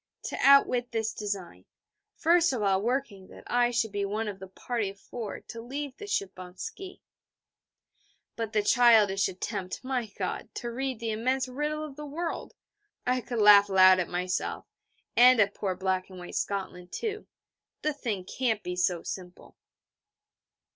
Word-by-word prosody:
to - - -4
outwit 255 -3 +5
this 225 -1 -1
design, 200 -4 -5 0.5
first 335 -2 +3
of 230 -4 -2
all 195 -1 +2
working 230 -5 -2
that - - -14
I 245 0 +2
should 235 -3 0
be 200 0 -2
one 210 +3 -2
of 200 -2 -5
the 190 - -9
party 215 +2 -3
of 195 0 -12
four 225 -2 -7
to 230 - -9
leave 275 +3 -5
the 415 - -8
ship 195 - -2
on 180 0 -10
ski. 370 - -8 1.3
But 225 -2 -3
the 210 -1 +1
childish 215 -4 +5
attempt, 185 +2 -5
my 255 -3 -2
God, 185 -3 -3
to 240 - -4
read 260 0 -3
the 230 -1 -2
immense 255 +4 0
riddle 300 +4 -3
of 290 -2 -10
the 300 - -6
world! 330 +4 -5 0.5
I 250 0 +1
could 240 0 -5
laugh 205 -1 +8
loud 185 -1 +7
at 180 - -1
myself, 180 +1 -2 0.5
and 250 0 +7
at 200 -1 +4
poor 190 -2 -2
Black 185 0 -1
and 185 - -11
White 175 0 -9
Scotland, 180 -3 -3
too. 430 -2 -4 0.6
The 305 - +1
thing 215 -10 -4
can't 225 -1 -1
be 180 0 -4
so 180 -1 0
simple. 180 -1 -8
220 Hz, 170 wpm, -28 LUFS, 190-255 Hz, 1.3 s, laugh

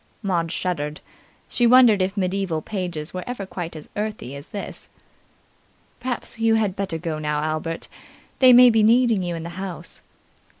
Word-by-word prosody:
Maud 170 -4 0
shuddered. 155 -4 -3 0.5
She 240 - +2
wondered 240 -5 +6
if 190 +2 -1
medieval 185 -3 -1
pages 175 -6 -4
were 180 -1 -4
ever 245 -5 -4
quite 175 -3 -6
as 155 - -9
earthy 210 - -4
as 140 +1 -9
this. 205 - -7 1.1
"Perhaps 245 -2 -4
you 225 0 +3
had 210 -4 0
better 190 -4 -3
go 160 -2 -4
now, 150 -1 -1
Albert. 155 +1 -3 0.5
They 255 -1 +8
may 250 0 +8
be 225 -1 +3
needing 230 -1 +4
you 175 -1 -3
in 165 - -6
the 170 - -6
house." 190 -3 -7
190 Hz, 165 wpm, -23 LUFS, 165-220 Hz, 1.1 s, They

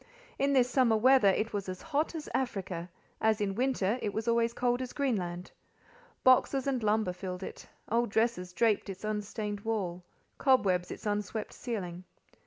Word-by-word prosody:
In 280 +1 +2
this 255 -2 +4
summer 250 -3 +3
weather, 255 -1 +5
it 215 +3 +1
was 200 -2 -3
hot 315 +1 -1
as 310 - -5
Africa; 190 -9 -2 0.3
as 220 0 +3
in 200 -2 0
winter, 240 -2 0
it 205 - -2
was 220 +1 -2
always 235 0 +3
cold 245 +1 0
as 255 - -5
Greenland. 185 -11 -2 0.7
Boxes 255 +1 +4
and 265 -3 0
lumber 215 -3 +1
filled 180 0 -6
it; - - -8 0.2
old 235 +1 +1
dresses 220 -4 0
draped 210 +2 +1
its 195 +1 -7
unstained 210 0 -3
wall—cobwebs 190 0 0
its - - -8
unswept 210 +1 -2
ceiling. 185 -7 -5
220 Hz, 155 wpm, -31 LUFS, 195-245 Hz, 0.7 s, weather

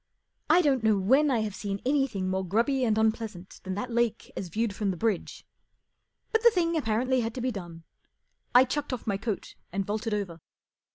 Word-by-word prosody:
I 345 +3 +6
clont 270 -5 +2
know 215 -2 +4
when 265 +10 +4
I 240 -4 +2
have 215 -2 -3
seen 200 -1 -4
anything 270 -9 +1
more 190 0 0
grubby 235 +8 +1
and 220 -3 +2
unpleasant 220 -4 -1
than 190 -1 -4
the 205 - -2
lake 235 -2 -1
as 190 - -4
viewed 215 +4 -1
from 205 0 -1
the 185 - -2
bridge; 215 -2 -2 0.9
but 445 - +2
the 470 - +8
thing 340 -5 0
apparently 255 -1 +1
had 225 0 -3
to - - -4
be 255 +1 0
done. 175 -6 -8 0.7
I 250 +1 +8
chucked 285 +1 -3
off 250 - -5
my 200 -3 0
coat 210 0 -4 0.2
and 195 +1 -1
vaulted 215 +2 -2
over. 175 -6 -4
220 Hz, 195 wpm, -28 LUFS, 195-260 Hz, 0.9 s, the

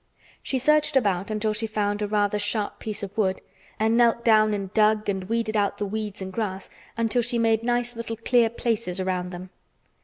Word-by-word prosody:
She 265 - -2
searched 300 +3 +3
about 200 -6 +1
until 215 0 0
she 225 +1 -2
found 205 -1 -1
a 210 - 0
rather 210 0 +1
sharp 205 0 -1
piece 210 -2 -4
of 200 +2 -6
wood 190 -3 +1 0.4
and 220 +1 +2
knelt 235 -1 +3
down 215 -2 +5
and 200 -1 -3
dug 215 0 +3
and 195 -2 -2
weeded 230 -1 -1
out 205 -1 +1
the 205 - -2
weeds 210 -1 -4
and 190 0 -7
grass 195 -3 -4 0.3
until 230 +1 +1
she 240 +1 -2
made 225 -1 +2
nice 240 0 -1
little 230 -1 -5
clear 230 0 +3
places 225 -5 -2
around 185 -1 -2
them. 180 +1 -9
215 Hz, 195 wpm, -25 LUFS, 200-230 Hz, 0.4 s, down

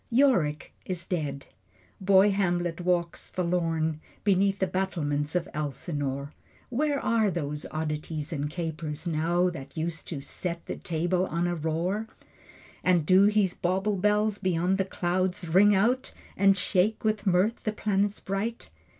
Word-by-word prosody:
Yorick 230 - +2
is 180 -2 -4
dead. 145 -6 -3 0.5
Boy 195 +1 +5
Hamlet 175 -3 0
walks 175 -1 -1
forlorn 165 -3 0 0.2
Beneath 195 0 +3
the 190 - +1
battlements 165 -5 -1
of 180 0 0
Elsinore. 145 -1 -3 0.4
Where 285 +3 0
are 220 -4 +2
those 150 -4 -3
oddities 155 +1 -3
and 145 -1 -2
capers 160 -1 -4
now 170 +2 +1
That 135 -4 -9
used 165 0 -3
to 155 - -4
"set 170 +4 -5
the - - -5
table 175 +2 0
on 170 +2 -1
a 175 - 0
roar"? 170 +7 -1 0.8
And 175 -4 +3
do 185 +4 +6
his 205 -3 +3
bauble 190 +4 0
bells 210 +2 +1
beyond 185 0 +1
the 190 - +2
clouds 180 -1 -1
Ring 200 +5 +5
out, 245 +7 +1 0.2
and 195 0 +4
shake 195 +3 +1
with 215 -1 0
mirth 190 +5 +2
the 215 - 0
planets 205 -1 0
bright? 195 - -4
180 Hz, 140 wpm, -28 LUFS, 160-195 Hz, 0.8 s, do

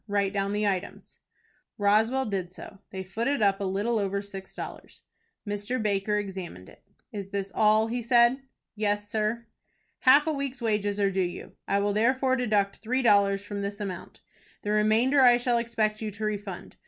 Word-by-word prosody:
Write 200 -1 0
down 200 0 -1
the 210 +1 0
items." 195 -1 -4 0.6
Roswell 220 +6 +2
did 190 -4 -3
so. 195 +2 -11
They 190 -1 -6
footed 230 +6 -1
up 195 0 +2
a - - -1
little 205 +5 0
over 200 0 -1
six 195 -1 -10
dollars. - - -9 0.4
Mr. 205 +5 -2
Baker 210 -1 0
examined 190 - -6
it. - - -18 0.3
"Is 200 -2 -6
this 195 -1 -4
all?" 215 0 +4
he 240 +2 -3
said. 235 +2 +4 0.3
"Yes, 205 -1 -1
sir." 220 +2 -2 0.5
"Half 280 +3 +6
a 315 - 0
week's 275 -3 -4
wages 210 -3 -1
are 200 -1 +2
due 190 0 0
you, 175 -1 -4 0.2
I 200 - +2
will 200 0 +1
therefore 260 +4 +2
deduct 210 -6 0
three 255 +4 -1
dollars 200 -3 +3
from 205 -1 -5
this 200 +1 -4
amount. 195 -4 -7 0.4
The 210 - -2
remainder 220 +6 +3
I 245 -2 +7
shall 240 -1 +1
expect 225 -2 -1
you 220 - -2
to 210 +1 -5
refund. 205 -3 -5
210 Hz, 180 wpm, -27 LUFS, 200-235 Hz, 0.6 s, I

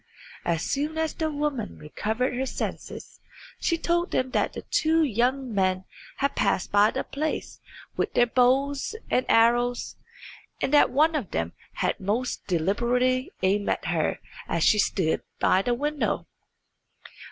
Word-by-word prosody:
As 170 -1 0
soon 300 +3 -2
as 320 -1 0
the 315 -1 -1
woman 290 -7 -3
recovered 220 - -2
her 260 +2 -2
senses - - -6 0.4
she 335 - +1
told 345 +1 0
them 255 0 -1
that - - 0 0.2
two 320 +1 +3
young 255 0 0
men 185 -1 +1 0.3
had 280 +1 -1
passed 180 - 0
by 205 +1 +5
the 265 - -2
place 305 +2 -4 0.4
with - - -1
their 240 - +5
bows 270 - +2 0.2
and 255 - +2
arrows, 240 +2 +3 0.6
and 270 - -1
that 290 - +6
one 310 +5 +3
of 280 - -2
them 85 +1 -2 0.2
had - - -1
most 225 +6 -2
deliberately 240 +9 +1
aimed 200 +2 +2
at - - -1
her 165 -3 0 0.3
as 170 -1 0
she 210 - +5
stood 170 -5 +1 0.2
by 185 - +4
the 240 +4 0
window. 295 +3 -1
250 Hz, 145 wpm, -26 LUFS, 205-285 Hz, 0.6 s, that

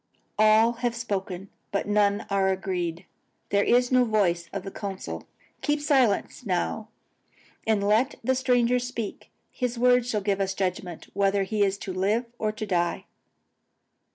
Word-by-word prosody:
"All 215 +2 +6
have 240 -2 0
spoken, 195 -4 -4 0.2
but 200 - -1
none 205 -1 +2
are 195 -1 +2
agreed. 180 -2 -2 0.4
There 200 0 +3
is 245 +1 +3
no 255 -1 +5
voice 180 -7 +1
of - - -4
the 195 - -6
council. 195 -2 -6 0.3
Keep 295 0 +1
silence 265 -8 +1
now, 210 +2 -1 0.8
and 205 -2 +2
let 225 +5 +3
the 260 +3 +2
stranger 250 -1 +2
speak. 240 -4 -5 0.2
His 250 -2 -2
words 245 0 +4
shall 210 -3 0
give 200 0 0
us 195 0 -1
judgment, 180 -3 -3
whether 200 0 +2
he 210 +2 -2
is 195 0 +1
to 190 - -6
live 205 +6 +1
or 215 -1 0
to 215 0 -5
die." 175 -3 0
205 Hz, 155 wpm, -26 LUFS, 195-240 Hz, 0.8 s, All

